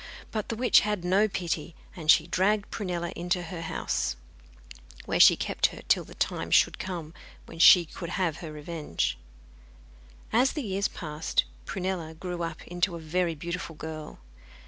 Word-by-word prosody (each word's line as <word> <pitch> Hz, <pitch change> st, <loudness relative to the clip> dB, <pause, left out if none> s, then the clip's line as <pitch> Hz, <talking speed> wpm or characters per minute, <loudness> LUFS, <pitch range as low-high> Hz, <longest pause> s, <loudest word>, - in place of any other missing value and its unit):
But 215 Hz, -2 st, -3 dB
the 230 Hz, -, -2 dB
witch 245 Hz, +2 st, +5 dB
had 210 Hz, -4 st, -2 dB
no 195 Hz, +4 st, +4 dB
pity, 170 Hz, -4 st, -3 dB, 0.2 s
and 160 Hz, -4 st, -7 dB
she 155 Hz, -, +7 dB
dragged 200 Hz, +4 st, +1 dB
Prunella 175 Hz, -5 st, -3 dB
into 175 Hz, +1 st, -1 dB
her 170 Hz, 0 st, -6 dB
house, 65 Hz, -, -2 dB, 0.9 s
where -, -, -1 dB
she -, -, +9 dB
kept -, -, +1 dB
her -, -, -10 dB
till -, -, +3 dB
the -, -, -14 dB
time -, -, -2 dB
should -, -, +4 dB
come 170 Hz, -4 st, -5 dB, 0.3 s
when 165 Hz, -, -11 dB
she 175 Hz, 0 st, +9 dB
could 170 Hz, +2 st, -7 dB
have 170 Hz, -5 st, 0 dB
her 160 Hz, -3 st, -7 dB
revenge. 150 Hz, -, -3 dB, 1.1 s
As 250 Hz, +4 st, +4 dB
the 300 Hz, -, -3 dB
years 200 Hz, -1 st, 0 dB
passed 155 Hz, -1 st, -1 dB, 0.2 s
Prunella 180 Hz, -4 st, -3 dB
grew 175 Hz, +1 st, -5 dB
up 165 Hz, -1 st, -4 dB
into 175 Hz, +1 st, -1 dB
a -, -, -6 dB
very 165 Hz, +1 st, -1 dB
beautiful 170 Hz, +1 st, -5 dB
girl. 155 Hz, 0 st, -7 dB
175 Hz, 165 wpm, -28 LUFS, 160-190 Hz, 1.1 s, she